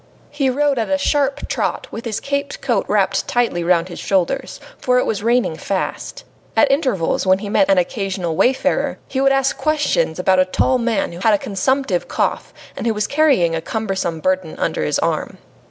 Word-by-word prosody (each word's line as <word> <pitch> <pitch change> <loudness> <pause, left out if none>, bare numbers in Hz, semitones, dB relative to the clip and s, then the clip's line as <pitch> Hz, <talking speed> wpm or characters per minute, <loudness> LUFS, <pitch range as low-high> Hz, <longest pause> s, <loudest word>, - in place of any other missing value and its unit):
He 285 -2 0
rode 280 0 +1
at 225 - -2
a 285 - +2
sharp 280 -1 0
trot, - - -2
with 230 - -7
his 220 -3 -2
caped 280 0 -3
coat - - 0
wrapped - - +1
tightly 235 -8 0
round 170 0 +2
his 175 - -8
shoulders, 200 +8 -1 0.2
for 250 0 +2
it 250 - +2
was 205 - -2
raining 235 -6 +1
fast. 200 - -4 0.3
At 290 -2 +5
intervals, 255 - 0
when 185 0 +5
he 200 +1 -6
met 200 -1 +2
an 195 - +4
occasional 185 -2 -1
wayfarer, 260 +9 +1
he 265 - -2
would 275 0 +4
ask 270 0 +1
questions 295 - +1
about 185 0 +2
a 185 - +5
tall 255 +7 +1
man 230 -6 0
who 170 - -9
had 215 +2 +4
a - - +1
consumptive 205 0 -1
cough, - - -1 0.2
and - - -3
who 225 - +1
was 210 0 0
carrying 275 - +2
a 165 - -2
cumbersome 190 -5 -3
burden 185 -2 -1
under - - -1
his - - 0
arm. - - -2
220 Hz, 195 wpm, -19 LUFS, 185-270 Hz, 0.3 s, At